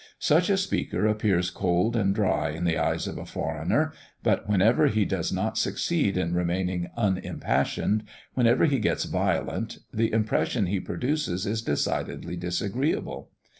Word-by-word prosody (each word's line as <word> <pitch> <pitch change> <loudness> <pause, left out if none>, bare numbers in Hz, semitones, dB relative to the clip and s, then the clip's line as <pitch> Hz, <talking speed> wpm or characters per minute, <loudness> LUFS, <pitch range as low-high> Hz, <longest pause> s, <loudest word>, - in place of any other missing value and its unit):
Such - - +3
a - - +3
speaker 100 - -1
appears 100 -4 +1
cold 90 +7 +1
and 100 -3 +2
dry 105 -3 +1
in 80 +3 -4
the 85 -2 +2
eyes 80 - 0
of - - -5
a - - -7
foreigner; - - -1 0.3
but - - +1
whenever 105 +4 +4
he 105 -1 +2
does 90 -4 -1
not 110 +4 -1
succeed 145 - 0
in 85 -2 0
remaining 90 0 -1
unimpassioned, 105 +1 0 0.3
whenever 120 +2 +4
he 140 -4 +2
gets 110 - +1
violent, - - -1 0.2
the 115 +1 +1
impression 110 0 +1
he 95 +2 0
produces 95 - -2
is 110 +2 -1
decidedly 80 +1 -2
disagreeable. 100 - -2
100 Hz, 145 wpm, -26 LUFS, 90-110 Hz, 0.3 s, whenever